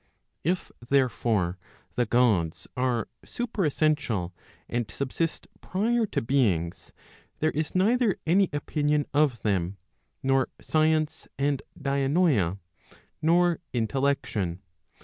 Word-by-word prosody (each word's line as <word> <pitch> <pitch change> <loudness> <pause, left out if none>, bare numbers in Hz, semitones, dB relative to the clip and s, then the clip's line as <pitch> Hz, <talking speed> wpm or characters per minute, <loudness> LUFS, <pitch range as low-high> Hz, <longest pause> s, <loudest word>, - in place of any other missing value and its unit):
If, 180 +4 -1 0.2
therefore, 115 -9 +1 0.3
the 120 - 0
Gods 105 -10 +2
are 125 -3 0 0.2
superessential, 155 - 0 0.4
and 120 -2 -2
subsist 145 +4 -2
prior 225 +4 +1
to - - -2
beings, 100 -10 0 0.5
there 155 +1 +1
is 155 +2 -3
neither 220 +2 +3
any 185 +3 +4
opinion 145 0 0
of 145 -5 +2
them, 95 -2 0 0.5
nor 135 0 +2
science 155 0 +1
and 140 0 +1 0.2
dianoia, 140 - +2 0.6
nor 170 +1 +3
intellection. 110 -7 -1
140 Hz, 95 wpm, -27 LUFS, 115-160 Hz, 0.6 s, any